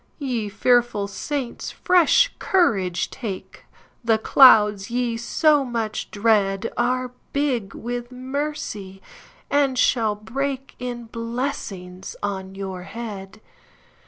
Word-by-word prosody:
Ye 245 -8 -2
fearful 235 -1 +2
saints, 255 +5 -4
fresh 365 +7 +4
courage 195 - +1
take, 205 -7 -7 0.4
The 225 -1 +3
clouds 210 -5 +6
ye 240 -1 -1
so 290 +5 +3
much 230 -4 -3
dreadAre 230 +4 +1 0.2
big 260 -8 -1
with 240 +1 -5
mercy, 255 -7 -4 0.5
and 280 -2 +2
shall 225 -4 +2
breakIn 250 0 -5
blessings 230 -6 -5
on 190 -1 -4
your 190 -2 -5
head. 200 0 -8
230 Hz, 95 wpm, -23 LUFS, 200-255 Hz, 0.5 s, clouds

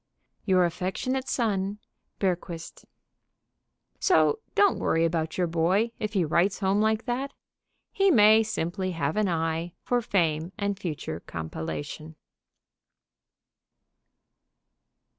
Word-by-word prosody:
Your 185 -2 +4
affectionate 190 +10 -2
son, 205 -4 -1 0.4
BERGQUIST. 175 -3 -3 1.1
So 445 - +3 0.2
don't 405 -2 +4
worry 165 +1 +2
about 160 -1 -1
your 180 - +2
boy 175 +7 +1
if 215 -1 -3
he 185 -5 +2
writes 170 +5 +2
home 195 +1 +1
like 220 0 +1
that. 260 +3 -2 0.6
He 390 0 +3
may 220 - +7
simply 185 -3 -2
have 155 -2 -1
an 215 -1 +2
eye 165 0 -1
for 245 -1 +1
fame 170 -4 0
and 200 -2 -2
future 150 - -4
compilation. 80 - -6
185 Hz, 105 wpm, -27 LUFS, 165-215 Hz, 1.1 s, may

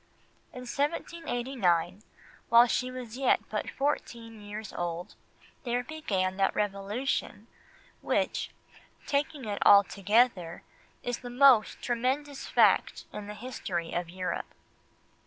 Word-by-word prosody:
In 250 - -9
1789, 245 - -1 0.5
while 235 +1 +8
she 250 +1 -1
was 250 -2 -7
yet 270 - +4
but - - -2
fourteen 230 -6 -3
years 210 +1 -7
old, 175 0 -4 0.5
there 245 -1 -1
began 195 -11 -2
that 195 -1 +1
Revolution 205 +5 -2 0.6
which, - - 0 0.6
taking 280 -1 -1
it 205 -1 -4
altogether, 200 -2 +4 0.4
is 245 -1 -3
the 245 - -8
most 250 -3 +5
tremendous 265 +4 -1
fact - - +3
in 205 -1 -6
the 210 - -7
history 190 -8 -4
of 175 -1 -2
Europe. 185 +1 -4
230 Hz, 110 wpm, -29 LUFS, 195-255 Hz, 0.6 s, while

